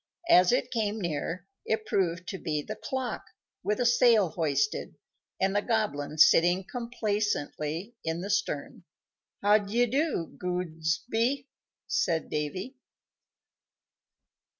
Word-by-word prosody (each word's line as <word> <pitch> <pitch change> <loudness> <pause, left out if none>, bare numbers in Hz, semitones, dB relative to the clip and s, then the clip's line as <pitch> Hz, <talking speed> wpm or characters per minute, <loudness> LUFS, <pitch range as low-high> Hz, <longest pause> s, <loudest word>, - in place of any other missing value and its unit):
As 180 - +7
it 250 0 +1
came 220 -2 -1
near, 170 +1 -3 0.2
it 220 0 -1
proved 180 -3 0
to 190 - -5
be 150 -3 -2
the - - -6
clock, 260 -2 -4 0.4
with 210 0 -1
a 245 - +2
sail 235 -5 +5
hoisted, 155 +3 -1 0.4
and 195 +1 +1
the 205 - +3
Goblin 205 -11 -1
sitting 175 +4 +6
complacently 205 - -2
in 160 +1 -2
the 200 +3 -3
stern. 200 -8 -2 0.6
"How 205 +1 +6
d'ye 215 +4 +1
do, 265 - -1
Gobsy?" 180 - -1 0.4
said 460 - 0
Davy. 185 - -3
200 Hz, 115 wpm, -28 LUFS, 165-230 Hz, 0.6 s, As